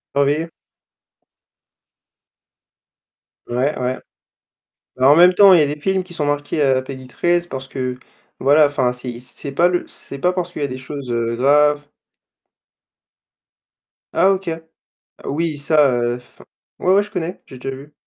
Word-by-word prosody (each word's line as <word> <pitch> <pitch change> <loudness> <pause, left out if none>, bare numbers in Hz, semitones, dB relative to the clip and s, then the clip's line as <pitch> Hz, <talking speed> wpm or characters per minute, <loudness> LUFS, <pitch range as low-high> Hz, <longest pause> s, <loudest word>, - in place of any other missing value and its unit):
Surveiller? 145 +4 +1 3.0
Ouais, 130 +5 -1
ouais. 125 0 -2 1.0
Bah, 130 +1 +4
en 145 - +8
même 175 +3 +7
temps 195 +1 +7
il 170 - +6
y - - +5
a - - +2
des 150 - -7
films 190 +3 0
qui 180 -1 -14
sont 155 -4 -2
marqués 145 +1 -2
à 135 -2 +3
la 130 - 0
PEGI13 135 +7 -2
c'est - - -21
parce 130 -2 -6
que, 130 -2 -4 0.4
voilà 145 +3 +5
enfin, 130 -4 0
c'est 125 -1 -7
c'est 135 +2 -7
pas 170 +6 +3
le 180 -1 -1
c'est 140 - -10
pas 180 +6 +1
parce 180 -1 -3
qu'il 165 - -8
y - - 0
a - - -1
des 130 - -6
choses, 130 +1 -8
heu, 115 0 -1
graves. 145 +3 +3 2.3
Ah 185 +3 +4
OK. 195 -1 -2 0.8
Oui 155 +1 -2
ça, 145 -1 +3
heu, 120 0 0
enfin 125 0 -17 0.3
ouais, 185 - +2
ouais 200 - +4
je 205 - -10
connais, 180 -3 -5
j'ai 130 - -12
déjà 135 +1 -5
vu 145 +2 -14
145 Hz, 165 wpm, -19 LUFS, 130-170 Hz, 3.0 s, en